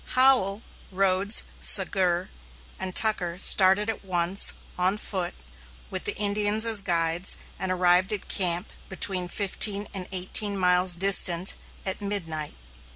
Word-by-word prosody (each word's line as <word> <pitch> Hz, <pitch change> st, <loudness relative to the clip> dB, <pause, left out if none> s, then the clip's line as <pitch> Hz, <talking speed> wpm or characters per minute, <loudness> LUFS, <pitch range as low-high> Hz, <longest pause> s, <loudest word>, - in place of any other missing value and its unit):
Howell, 245 Hz, -6 st, +3 dB, 0.3 s
Rhodes, 195 Hz, +2 st, +1 dB, 0.2 s
Sagur, 185 Hz, -2 st, +2 dB, 0.5 s
and 185 Hz, -1 st, -6 dB
Tucker 180 Hz, -6 st, 0 dB
started 190 Hz, +2 st, +4 dB
at 225 Hz, -2 st, -5 dB
once, 180 Hz, 0 st, +1 dB, 0.2 s
on 185 Hz, +3 st, -1 dB
foot, 185 Hz, -4 st, -5 dB, 0.6 s
with -, -, -6 dB
the -, -, -1 dB
Indians 210 Hz, +1 st, +1 dB
as 220 Hz, -3 st, +2 dB
guides, 170 Hz, -1 st, 0 dB, 0.2 s
and 190 Hz, -1 st, -3 dB
arrived 180 Hz, +2 st, +1 dB
at 210 Hz, -2 st, -6 dB
camp, 180 Hz, 0 st, 0 dB, 0.2 s
between 190 Hz, -1 st, -2 dB
fifteen 200 Hz, +2 st, -1 dB
and 190 Hz, -2 st, -4 dB
eighteen 195 Hz, +2 st, +1 dB
miles 180 Hz, -1 st, +3 dB
distant, 185 Hz, -1 st, +3 dB, 0.3 s
at 190 Hz, +1 st, -3 dB
midnight. 165 Hz, -7 st, -5 dB
190 Hz, 125 wpm, -24 LUFS, 180-205 Hz, 0.6 s, started